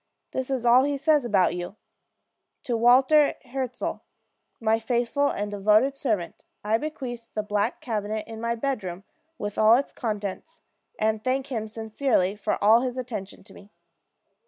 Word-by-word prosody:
This 260 Hz, 0 st, -3 dB
is 260 Hz, -3 st, -2 dB
all 240 Hz, +2 st, +7 dB
he 285 Hz, +1 st, 0 dB
says 295 Hz, -1 st, +2 dB
about 200 Hz, -6 st, +3 dB
you: 175 Hz, +3 st, -6 dB, 0.9 s
'To 240 Hz, -, -1 dB
Walter 260 Hz, +6 st, +5 dB
Hirzel, 255 Hz, -1 st, -4 dB, 0.6 s
my 225 Hz, 0 st, +2 dB
faithful 240 Hz, +5 st, 0 dB
and 205 Hz, 0 st, -3 dB
devoted 215 Hz, +7 st, +3 dB
servant, 215 Hz, -, -2 dB, 0.2 s
I 215 Hz, +2 st, +1 dB
bequeath 245 Hz, -6 st, -6 dB
the 215 Hz, -, -1 dB
black 210 Hz, +2 st, -1 dB
cabinet 215 Hz, -2 st, -3 dB
in 225 Hz, -1 st, -8 dB
my 235 Hz, 0 st, -1 dB
bedroom, 210 Hz, -8 st, -3 dB, 0.3 s
with 205 Hz, -4 st, -4 dB
all 220 Hz, +1 st, +7 dB
its 275 Hz, +3 st, -1 dB
contents, 215 Hz, +8 st, -5 dB, 0.3 s
and 215 Hz, 0 st, 0 dB
thank 265 Hz, +1 st, -1 dB
him 220 Hz, -3 st, -2 dB
sincerely 220 Hz, -2 st, 0 dB
for 210 Hz, 0 st, -1 dB
all 220 Hz, +3 st, +6 dB
his 255 Hz, 0 st, -3 dB
attention 220 Hz, -6 st, -6 dB
to 205 Hz, -, -16 dB
me.' 200 Hz, -, -15 dB
230 Hz, 155 wpm, -25 LUFS, 210-260 Hz, 0.9 s, all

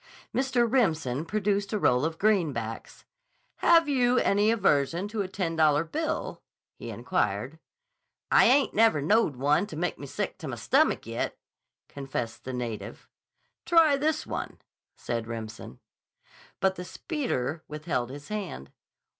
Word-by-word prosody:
Mr. 255 Hz, -2 st, +2 dB
Remsen 165 Hz, -, +1 dB
produced 200 Hz, +1 st, -1 dB
a -, -, +2 dB
roll 125 Hz, -9 st, +2 dB
of 160 Hz, 0 st, -2 dB
greenbacks. 155 Hz, -, -1 dB, 0.5 s
"Have 335 Hz, -2 st, +5 dB
you 250 Hz, -3 st, +2 dB
any 205 Hz, -2 st, +3 dB
aversion 175 Hz, -4 st, +2 dB
to 215 Hz, -1 st, -2 dB
a 195 Hz, -, -2 dB
ten 185 Hz, -3 st, -3 dB
dollar 155 Hz, -1 st, +4 dB
bill?" 310 Hz, -, -3 dB, 0.3 s
he -, -, -9 dB
inquired. -, -, -2 dB, 0.7 s
"I -, -, +6 dB
ain't 275 Hz, +1 st, +4 dB
never 225 Hz, -7 st, +4 dB
knowed 165 Hz, -, +2 dB
one 145 Hz, +9 st, +2 dB
teh 160 Hz, -, -8 dB
make 175 Hz, +3 st, -2 dB
me 140 Hz, -, -7 dB
sick -, -, -4 dB
t' -, -, -6 dB
my -, -, -4 dB
stommick -, -, +2 dB
yet," -, -, -3 dB, 0.5 s
confessed 130 Hz, -5 st, -5 dB
the 130 Hz, -, -4 dB
native. 120 Hz, -3 st, -5 dB, 0.6 s
"Try 325 Hz, -4 st, +5 dB
this 310 Hz, +2 st, 0 dB
one," -, -, -5 dB, 0.4 s
said 115 Hz, -2 st, -4 dB
Remsen. 110 Hz, -, -7 dB, 0.8 s
But 190 Hz, 0 st, +1 dB
the 180 Hz, -, -5 dB
speeder 175 Hz, -, -3 dB
withheld 150 Hz, -5 st, -3 dB
his 140 Hz, +2 st, -10 dB
hand. 200 Hz, -, -5 dB
175 Hz, 140 wpm, -27 LUFS, 140-225 Hz, 0.8 s, I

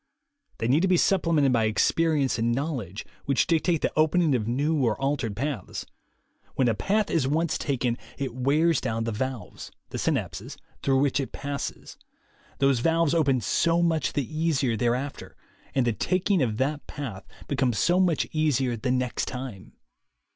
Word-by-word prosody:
They 115 Hz, -, -1 dB
need 140 Hz, +6 st, +3 dB
to 190 Hz, -, +3 dB
be 180 Hz, -1 st, +4 dB
supplemented 165 Hz, -8 st, +3 dB
by 115 Hz, -2 st, +3 dB
experience 140 Hz, +5 st, +2 dB
and 115 Hz, +1 st, +1 dB
knowledge, 125 Hz, -, -4 dB, 0.2 s
which 140 Hz, -1 st, +2 dB
dictate 165 Hz, 0 st, +1 dB
the -, -, 0 dB
opening 155 Hz, 0 st, +3 dB
of 110 Hz, -4 st, 0 dB
new 145 Hz, +4 st, +1 dB
or 115 Hz, -1 st, +1 dB
altered 135 Hz, -6 st, -1 dB
paths. 135 Hz, -5 st, -4 dB, 0.7 s
When 130 Hz, -, +2 dB
a 115 Hz, -, +3 dB
path 205 Hz, -, 0 dB
is 155 Hz, -6 st, +1 dB
once 160 Hz, +3 st, +1 dB
taken, 125 Hz, -4 st, -1 dB, 0.2 s
it 135 Hz, -4 st, -3 dB
wears 145 Hz, +5 st, +2 dB
down 115 Hz, 0 st, -2 dB
the 115 Hz, -, -2 dB
valves, 130 Hz, +1 st, -5 dB, 0.2 s
the -, -, -4 dB
synapses, -, -, -2 dB, 0.2 s
through 135 Hz, -1 st, +2 dB
which 140 Hz, 0 st, +2 dB
it 135 Hz, -, -3 dB
passes. 140 Hz, -1 st, -5 dB, 0.6 s
Those 135 Hz, -2 st, +3 dB
valves 165 Hz, +3 st, +2 dB
open 140 Hz, -6 st, +2 dB
so 170 Hz, +10 st, +2 dB
much 160 Hz, -3 st, +1 dB
the 140 Hz, -, 0 dB
easier 150 Hz, -7 st, +1 dB
thereafter, 125 Hz, +5 st, -2 dB, 0.4 s
and 130 Hz, -2 st, +3 dB
the 120 Hz, -, +1 dB
taking 185 Hz, -, +1 dB
of 110 Hz, -5 st, 0 dB
that 145 Hz, +3 st, -1 dB
path 110 Hz, -10 st, -7 dB, 0.2 s
becomes 130 Hz, -5 st, 0 dB
so 175 Hz, -, +3 dB
much 175 Hz, -5 st, +2 dB
easier 140 Hz, -6 st, +1 dB
the 115 Hz, +3 st, -3 dB
next 125 Hz, -1 st, 0 dB
time. 125 Hz, -6 st, -7 dB
135 Hz, 165 wpm, -26 LUFS, 120-160 Hz, 0.7 s, be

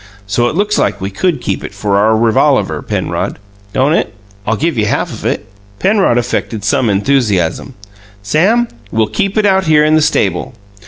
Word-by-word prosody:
So 115 Hz, +4 st, +1 dB
it -, -, -5 dB
looks 205 Hz, +3 st, +1 dB
like -, -, 0 dB
we 95 Hz, +1 st, -4 dB
could 155 Hz, -, -1 dB
keep 95 Hz, -, -3 dB
it 100 Hz, -, -8 dB
for 100 Hz, 0 st, -1 dB
our 110 Hz, +2 st, +3 dB
revolaver, 115 Hz, -1 st, +2 dB
Penrod, -, -, -3 dB, 0.3 s
don't 135 Hz, +7 st, +2 dB
it? -, -, -1 dB, 0.3 s
I'll 110 Hz, -, +2 dB
give 160 Hz, +6 st, -1 dB
you 105 Hz, -2 st, 0 dB
half -, -, -1 dB
of -, -, -4 dB
it." -, -, -2 dB, 0.3 s
Penrod 195 Hz, -, +2 dB
affected 115 Hz, -3 st, -2 dB
some 110 Hz, +3 st, +1 dB
enthusiasm. 105 Hz, -1 st, 0 dB, 0.5 s
"Sam, 195 Hz, -, +2 dB, 0.2 s
we'll 110 Hz, 0 st, +2 dB
keep 195 Hz, -, -2 dB
it 215 Hz, -, +3 dB
out 190 Hz, -1 st, +3 dB
here 150 Hz, -1 st, +4 dB
in 155 Hz, -, +3 dB
the 155 Hz, -, +4 dB
stable." 150 Hz, -, 0 dB
125 Hz, 180 wpm, -14 LUFS, 105-170 Hz, 0.5 s, here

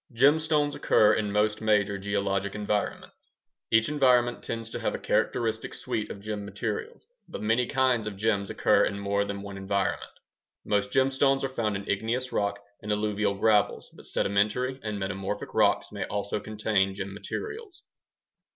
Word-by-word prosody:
Gemstones 145 Hz, +4 st, +3 dB
occur 105 Hz, -6 st, +4 dB
in 105 Hz, -2 st, 0 dB
most 105 Hz, +1 st, +1 dB
major 105 Hz, -2 st, +2 dB
geologic 100 Hz, 0 st, -1 dB
environments. 105 Hz, 0 st, -3 dB, 0.3 s
Each 115 Hz, -1 st, +4 dB
environment 125 Hz, -4 st, +3 dB
tends 115 Hz, -1 st, -4 dB
to -, -, -4 dB
have -, -, -1 dB
a -, -, -2 dB
characteristic 115 Hz, -1 st, -1 dB
suite 110 Hz, -, -3 dB
of 100 Hz, -, -7 dB
gem 105 Hz, 0 st, -4 dB
materials, 450 Hz, -, -5 dB, 0.2 s
but -, -, -6 dB
many 115 Hz, +3 st, +2 dB
kinds 130 Hz, -5 st, +2 dB
of 100 Hz, -2 st, -5 dB
gems 100 Hz, -2 st, 0 dB
occur -, -, +3 dB
in 100 Hz, -, -1 dB
more 100 Hz, 0 st, 0 dB
than 100 Hz, 0 st, -5 dB
one 100 Hz, -1 st, -7 dB
environment. 95 Hz, 0 st, -2 dB, 0.5 s
Most 100 Hz, -1 st, +1 dB
gemstones 135 Hz, +1 st, +2 dB
are 135 Hz, -, 0 dB
found 110 Hz, -5 st, -1 dB
in 100 Hz, 0 st, -5 dB
igneous 115 Hz, +5 st, -1 dB
rocks 100 Hz, 0 st, -1 dB, 0.2 s
and 105 Hz, -, -4 dB
alluvial 105 Hz, -1 st, 0 dB
gravels, 105 Hz, 0 st, +2 dB
but -, -, -12 dB
sedimentary 110 Hz, +7 st, 0 dB
and 105 Hz, -2 st, -3 dB
metamorphic 95 Hz, +1 st, -4 dB
rocks 105 Hz, -2 st, +2 dB
may 100 Hz, -2 st, -4 dB
also 100 Hz, 0 st, -2 dB
contain 105 Hz, -2 st, 0 dB
gem 100 Hz, 0 st, -5 dB
materials. 430 Hz, -, -7 dB
105 Hz, 160 wpm, -27 LUFS, 100-125 Hz, 0.5 s, occur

